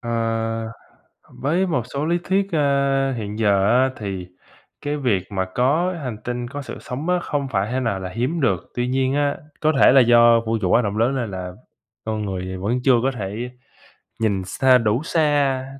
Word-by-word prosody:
Ờ, 120 - -5 1.2
với 170 +8 0
một 135 -8 0
số 140 +2 -1
lý 170 +2 +1
thuyết, 195 +1 0
ơ, 140 -3 +1
hiện 105 -2 -5
giờ 100 -3 +3
á 130 +3 +4
thì 95 -4 -5 0.5
cái 145 +1 -2
việc 115 -10 0
mà 95 -1 -1
có 155 +9 +2
hành 120 -5 -4
tinh, 120 0 -3
có 145 +3 -6
sự 140 - -8
sống 145 +8 -5
á 180 - +2
không 145 -4 -2
phải 100 -3 -1
thế 130 - 0
nào 115 -6 -1
là 95 -1 -5
hiếm 125 - -2
được, 95 -9 0
tuy 120 0 -1
nhiên 130 +1 0
á 145 -1 +1 0.2
có 155 - +3
thể - - +8
là 135 0 +7
do 120 -1 +6
vũ 115 0 0
trụ 90 - 0
quá 120 - +4
rộng 105 -1 -3
lớn 120 +5 +2
nên 120 -6 -2
là 90 -1 -6 0.5
con 110 -1 -2
người 95 -1 -4
vẫn 110 +7 -1
chưa 135 - +5
có 135 - +2
thể 110 +1 -5 0.7
nhìn 100 -4 0
xa, 130 +7 +4
đủ 115 +3 0
xa, 145 -5 +1
125 Hz, 195 wpm, -22 LUFS, 105-140 Hz, 1.2 s, thể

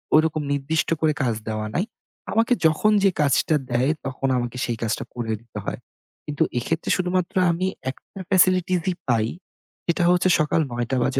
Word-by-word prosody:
ঐরকম 155 0 +3
নির্দিষ্ট 145 +3 0
করে 155 -1 +3
কাজ 120 -3 +1
দেওয়া 110 0 -2
নাই। 185 - +1 0.5
আমাকে 230 +3 +3
যখন 160 +7 +4
যে 195 - +6
কাজটা 145 +2 +3 0.2
দেয় 125 +4 +2
তখন 135 0 -2
আমাকে 120 0 -3
সেই 120 -2 -2
কাজটা 110 - -1
করে 115 -2 -2
দিতে 115 -2 -8
হয়। - - -4 0.5
কিন্তু 145 -1 0
এক্ষেত্রে 160 +7 -2
শুধুমাত্র 180 -1 -1 0.2
আমি 185 +3 -1 0.2
একটা 195 - -15
ফেসিলিটিসই 185 -1 +3 0.2
পাই। 115 -2 +2 0.6
সেটা 170 0 +1
হচ্ছে 180 +1 +3
সকাল 155 +1 +2
০৯ঃ০০ 120 +2 -1
বাজে 135 +1 +1
155 Hz, 160 wpm, -23 LUFS, 120-180 Hz, 0.6 s, যে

